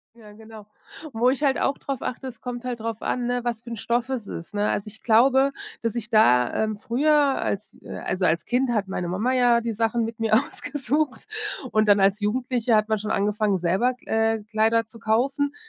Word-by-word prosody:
Ja, 215 Hz, -3 st, -15 dB
genau. 220 Hz, -1 st, -13 dB, 0.5 s
Wo 240 Hz, +3 st, +3 dB
ich 275 Hz, +3 st, -2 dB
halt 275 Hz, -1 st, +2 dB
auch 275 Hz, -, +1 dB
darauf 275 Hz, -3 st, -5 dB
achte, 260 Hz, +1 st, -4 dB
es 245 Hz, -3 st, -8 dB
kommt 245 Hz, 0 st, -6 dB
halt 245 Hz, -3 st, -4 dB
drauf 225 Hz, 0 st, -4 dB
an, 245 Hz, -1 st, -1 dB
ne, 245 Hz, 0 st, 0 dB
was 235 Hz, -1 st, -3 dB
für 235 Hz, -, -11 dB
'n 230 Hz, -, -4 dB
Stoff 240 Hz, +4 st, -1 dB
es 245 Hz, -6 st, -3 dB
ist, 170 Hz, +5 st, -8 dB
ne? 205 Hz, 0 st, +1 dB
Also, 205 Hz, -, -2 dB
ich 215 Hz, +1 st, -13 dB
glaube, 265 Hz, +4 st, +4 dB, 0.3 s
dass 230 Hz, -1 st, -1 dB
ich 225 Hz, -3 st, -4 dB
da, 215 Hz, -, +4 dB
ähm, 215 Hz, -1 st, -3 dB
früher 265 Hz, +8 st, +1 dB, 0.3 s
als, 200 Hz, +2 st, -3 dB
äh -, -, -8 dB
also, 185 Hz, 0 st, -2 dB
als 165 Hz, -1 st, +2 dB
Kind 250 Hz, +1 st, +1 dB
hat 205 Hz, -4 st, 0 dB
meine 180 Hz, -2 st, -3 dB
Mama 215 Hz, +8 st, 0 dB
ja 245 Hz, -2 st, +4 dB
die 230 Hz, -1 st, -3 dB
Sachen 225 Hz, +1 st, 0 dB
mit 225 Hz, 0 st, -6 dB
mir 225 Hz, -1 st, +2 dB
ausgesucht 290 Hz, -, -1 dB, 0.4 s
und 215 Hz, 0 st, +3 dB
dann 200 Hz, -1 st, +6 dB
als 195 Hz, +2 st, +3 dB
Jugendliche 240 Hz, +2 st, 0 dB
hat 215 Hz, 0 st, +3 dB
man 220 Hz, -1 st, +1 dB
schon 215 Hz, +1 st, -5 dB
angefangen, 205 Hz, -1 st, +1 dB
selber, 190 Hz, +9 st, +1 dB
K 225 Hz, -2 st, 0 dB
äh, 215 Hz, -, -9 dB
Kleider 225 Hz, +1 st, +1 dB
zu 230 Hz, +1 st, -14 dB
kaufen, 270 Hz, +6 st, 0 dB
225 Hz, 220 wpm, -24 LUFS, 215-245 Hz, 0.5 s, dann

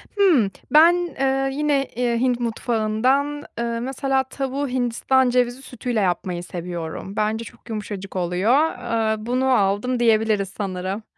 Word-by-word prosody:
Hımm. 315 Hz, -, +4 dB, 0.2 s
Ben, 330 Hz, +3 st, +7 dB, 0.2 s
eee, 270 Hz, 0 st, +1 dB
yine, 290 Hz, -1 st, +1 dB
eee, 240 Hz, -1 st, 0 dB
Hint 250 Hz, -1 st, +1 dB
mutfağından, 240 Hz, +5 st, 0 dB, 0.2 s
ııı, 235 Hz, 0 st, -2 dB
mesela, 265 Hz, +1 st, 0 dB
tavuğu 270 Hz, +1 st, -3 dB
hindistan 255 Hz, +1 st, +1 dB
cevizi 245 Hz, +1 st, +1 dB
sütüyle 245 Hz, -3 st, -3 dB
yapmayı 180 Hz, -2 st, -1 dB
seviyorum. 175 Hz, +2 st, -6 dB
Bence 215 Hz, +2 st, 0 dB
çok 240 Hz, 0 st, -15 dB
yumuşacık 205 Hz, -3 st, -6 dB
oluyor. 180 Hz, +6 st, +1 dB
Aaa, 230 Hz, -7 st, 0 dB
bunu 255 Hz, +2 st, +1 dB
aldım 210 Hz, +3 st, +1 dB
diyebiliriz 220 Hz, -4 st, +2 dB
sanırım. 195 Hz, +1 st, -4 dB
235 Hz, 130 wpm, -22 LUFS, 210-265 Hz, 0.2 s, Ben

